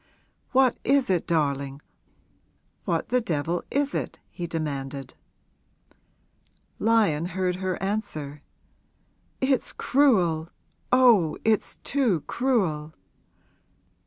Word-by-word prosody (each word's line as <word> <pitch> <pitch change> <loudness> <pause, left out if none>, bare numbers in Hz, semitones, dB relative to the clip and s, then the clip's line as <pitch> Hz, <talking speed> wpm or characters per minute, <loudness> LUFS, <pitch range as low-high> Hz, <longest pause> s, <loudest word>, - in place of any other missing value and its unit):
'What 260 -2 +3
is 275 -6 +3
it, 175 -3 0
darling, 140 -4 0 1.1
what - - -1
the 250 0 +2
devil 170 -2 -1
is 285 0 0
it?' - - -3
he 175 -2 -5
demanded. 140 -4 -4 1.7
Lyon 210 -9 +3
heard 180 0 -1
her 185 -1 -2
answer. 155 -9 -3 1.0
'It's 265 -1 +2
cruel 180 - +2 0.4
oh, 230 -11 +5
it's 220 -1 +1
too 240 - +1
cruel!' 175 - -1
180 Hz, 90 wpm, -26 LUFS, 155-240 Hz, 1.7 s, oh